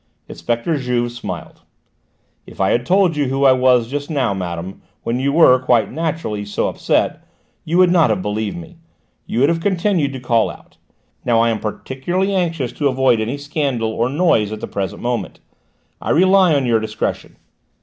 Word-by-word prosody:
Inspector 120 +8 -2
Juve 120 -2 -1
smiled. 95 -9 -8 0.9
"If - - -14
I 95 0 +2
had 120 +2 0
told 185 -3 +3
you 145 -1 0
who 135 +1 0
I 135 - +7
was 125 -2 +3
just 145 +3 -4
now, 135 -9 0
madame, 90 0 -5 0.2
when 120 +2 -1
you 140 +1 0
were, 140 -5 +6
quite 120 -5 +2
naturally, 155 -9 -3
so 105 0 -2
upset, - - -1 0.4
you 165 +2 0
would 180 -1 +5
not 170 -7 +4
have 105 -3 +1
believed 105 - -3
me. 170 0 -11 0.5
You 120 - -1
would 140 - +4
have 165 0 0
continued 180 -5 0
to 130 - -6
call 120 -3 +1
out. - - -14 0.5
Now, 115 -2 +2
I 115 0 +3
am 110 - -2
particularly 175 - -3
anxious 165 -9 -1
to 145 - -1
avoid 130 -3 +2
any 120 +6 -3
scandal 140 -6 -2
or 115 +2 -1
noise 135 - +2
at 110 - -5
the - - -5
present 95 -2 -4
moment. 120 -5 -3 0.6
I - - -5
rely 185 -1 +4
on 140 -2 +1
your 115 -2 +2
discretion." 110 - -4
130 Hz, 180 wpm, -19 LUFS, 115-160 Hz, 0.9 s, I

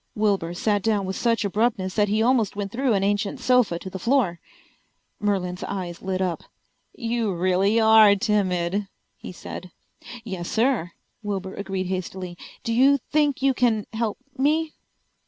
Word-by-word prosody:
Wilbur 195 -5 0
sat 205 +2 +1
down 210 -2 +1
with 190 0 -3
such 230 0 +1
abruptness 200 -2 0
that 210 -1 +2
he 215 +2 +1
almost 235 -5 +2
went 200 -1 -4
through 255 +1 +1
an 195 -1 +1
ancient 205 +5 0
sofa 250 -8 +3
to 180 - -9
the 190 0 -6
floor. 230 -6 +1 0.8
Merlin's 185 -3 -1
eyes 180 -3 -5
lit 190 0 -1
up. 180 -2 -2 0.5
"You 230 -2 -1
really 185 +5 +2
are 220 -2 +7
timid," 195 -2 0 0.3
he - - -9
said. 185 0 -8 0.5
"Yes, 190 -6 -5
sir," 225 -7 +1 0.3
Wilbur 195 -2 -4
agreed 195 -2 -3
hastily. 185 -1 -4 0.3
"Do 230 - -1
you 270 +4 +5
think 295 -3 +1
you 275 -1 +4
can 230 -4 +1
help 220 -1 -2 0.2
me?" 305 +3 +1
205 Hz, 155 wpm, -24 LUFS, 185-230 Hz, 0.8 s, are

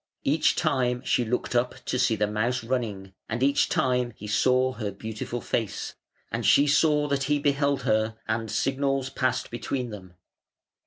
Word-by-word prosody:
Each 150 +3 +2
time 130 -6 0
she 125 - +2
looked 120 +2 -2
up 125 +1 +1
to 125 - -1
see 125 -3 +3
the 105 0 +1
mouse 115 +5 -1
running, 110 -6 -3 0.2
and 115 +3 -1
each 140 +1 +3
time 125 -2 +1
he 105 - -9
saw 130 +4 +2
her 110 -3 -4
beautiful 110 +4 -5
face, 110 -5 -3 0.4
and - - -2
she 140 - +5
saw 150 0 +3
that 140 -1 0
he 150 +1 +2
beheld 140 -2 +1
her, 110 -2 +1
and 110 0 -1
signals 135 +1 0
passed 130 -1 -1
between 120 0 -3
them. 95 -4 -10
125 Hz, 165 wpm, -26 LUFS, 110-135 Hz, 0.4 s, she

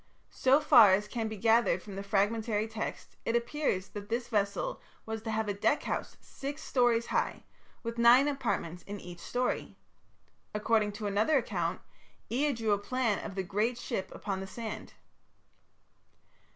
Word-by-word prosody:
So 265 +2 +4
far 215 -9 +7
as 205 +2 -3
can 225 0 -2
be 220 -1 -5
gathered 225 +3 +3
from 200 -2 -9
the 195 - -4
fragmentary 210 +2 0
text, 220 0 -6
it 230 - 0
appears 235 -5 -1
that 205 -1 -8
this 240 +1 -2
vessel 210 - -1 0.2
was 220 0 -4
to 225 - -5
have 220 0 -1
a 205 - 0
deck 205 +8 +1
house - - -3
six 285 +3 -7
stories 240 -2 +2
high, - - -1 0.4
with 230 0 -4
nine 245 +4 +7
apartments 200 - -2
in 205 0 -5
each 175 -1 -10
story. 250 +6 -2 0.8
According 210 -1 +2
to 210 +1 -6
another 210 +9 +2
account, 250 - -2 0.5
Ea 285 +5 +2
drew 225 -4 -1
a 205 - +3
plan 230 -1 0
of 195 - -6
the 190 - -1
great 210 +6 0
ship 190 -5 -3
upon 195 -2 -4
the 190 - -6
sand. 220 +2 -7
220 Hz, 165 wpm, -31 LUFS, 205-240 Hz, 0.8 s, far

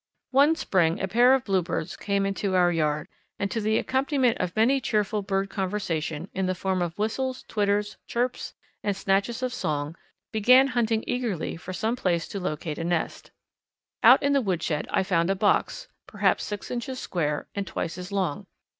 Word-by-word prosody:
_ - - -66 0.3
One 285 +4 +5
spring 175 - +1
a 195 - -1
pair 245 +5 +5
of 265 - -2
Bluebirds 180 -5 -1
came 200 -1 -1
into 195 -1 -1
our 175 -1 +4
yard, 150 -2 0 0.3
and 200 -1 -2
to 225 - -1
the 215 +1 +2
accompaniment 265 -2 +1
of 175 - -2
much 260 +5 +3
cheerful 210 -2 0
bird 195 0 -1
conversation, 175 -5 -2
in 190 -1 -1
the 185 - 0
form 185 0 -1
of 170 -1 -3
whistles, 255 +5 -2
twitters, 205 -1 0
chirps, 245 +1 -2 0.3
and 205 -1 0
snatches 200 +7 0
of 250 -1 -1
song, 150 +1 -2 0.4
began 250 +5 +6
hunting 225 -3 +1
eagerly 240 -9 -2
for 180 +2 -8
some 220 +6 -1
place 175 -8 0
to 200 - -4
locate 155 -3 -4
a - - -2
nest. 170 -1 -2 0.7
Out - - +7
in 280 0 +3
the 280 - +3
woodshed 170 -7 -1
I - - +1
found 175 -2 +1
a 195 - +2
box, 205 +2 +1 0.2
perhaps - - +1
six 205 -2 -6
inches 250 +1 -4
square 150 -10 -2
and 200 -1 -3
twice 170 -1 -3
as 180 +2 -7
long. 185 -7 -2
200 Hz, 180 wpm, -26 LUFS, 175-235 Hz, 0.7 s, Out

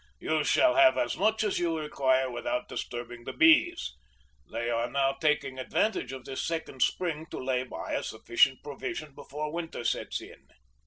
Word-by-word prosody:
You 155 - 0
shall 315 - +4
have 335 -1 +7
as 305 - 0
much 220 0 +2
as 210 - 0
you 170 -2 0
require 130 -4 +1
without 125 0 -2
disturbing 120 0 -6
the - - -6
bees. 335 +2 +4 0.6
They 120 - -2
are 120 0 0
now 135 +1 +2
taking 140 -2 0
advantage 130 - 0
of 130 -2 -8
this 130 - -4
second 160 -6 -4
spring 160 -3 0
to - - -6
lay 130 -1 0
by 130 - -6
a - - 0
sufficient 120 +4 +2
provision 145 +1 -5
before 150 +3 -6
winter 165 -7 -4
sets - - -1
in." - - -14
145 Hz, 170 wpm, -29 LUFS, 130-170 Hz, 0.6 s, have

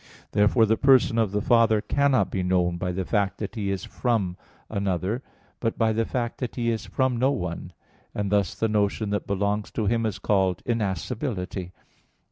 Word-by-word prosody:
Therefore 105 +3 +4
the 110 +1 +2
Person 130 -4 +4
of 110 -4 +1
the 105 0 -1
Father 115 -2 +4
cannot 140 +4 +2
be 95 - -1
known 90 -1 +1
by 90 +1 -2
the 95 +1 -3
fact 100 -2 0
that 105 +1 -5
He 105 -4 -2
is 95 -1 -2
from 110 -8 -1 0.3
another; 100 +2 -1 0.4
but 115 -2 -1
by 110 -1 +2
the 115 +1 0
fact 120 -1 -3
that 125 -3 -4
He 115 -2 0
is 110 - -3
from 130 -2 0
no 130 +3 +3
one; 90 -8 -3 0.4
and 100 -1 -2
thus 100 -4 +1
the 115 - 0
notion 105 0 0
that 105 - -2
belongs 100 +1 -1
to 110 - -1
Him 115 +2 +1
is 100 -3 -3
called 95 -1 +1
"innascibility." 100 - -2
105 Hz, 185 wpm, -25 LUFS, 95-115 Hz, 0.4 s, Therefore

